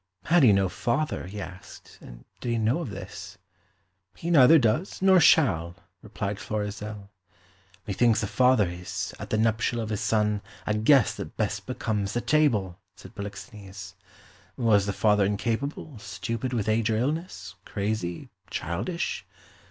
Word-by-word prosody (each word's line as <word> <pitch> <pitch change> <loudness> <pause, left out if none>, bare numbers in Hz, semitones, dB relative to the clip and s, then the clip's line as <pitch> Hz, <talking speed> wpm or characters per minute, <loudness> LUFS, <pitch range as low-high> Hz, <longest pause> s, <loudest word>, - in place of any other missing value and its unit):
Had 170 +1 +4
he 125 -6 +7
no 100 -1 +3
father, 120 - -2
he 105 +2 -7
asked, 90 -1 -11
and - - -13
did 120 - -4
he 120 - +1
know 115 +8 +1
of 165 - -4
this? 95 -1 -9 0.8
"He 170 - -4
neither 155 0 +8
does 125 - 0
nor 190 -1 +6
shall," 90 - +4 0.3
replied 100 0 -4
Florizel. 105 -1 -5 0.7
"Methinks 110 +2 +2
a - - +1
father 120 0 +3
is, 90 +1 -5
at - - -7
the 110 - +1
nuptial 110 +1 +1
of 110 -1 -3
his 105 -2 -2
son, 105 -2 +1 0.2
a 105 - 0
guest 110 +2 +4
that - - -7
best - - -2
becomes 105 -3 -2
the 120 - -1
table," 115 - +1 0.2
said - - -13
Polixenes. 100 -2 -9 0.6
Was 105 -5 +3
the - - +1
father 105 -1 +3
incapable, 115 +6 -2
stupid 105 +5 -4
with 115 -5 -1
age 110 +1 +1
or 110 - +1
illness, 155 +9 -3
crazy, 100 -4 -3 0.2
childish? 100 - -3
110 Hz, 150 wpm, -26 LUFS, 100-125 Hz, 0.8 s, neither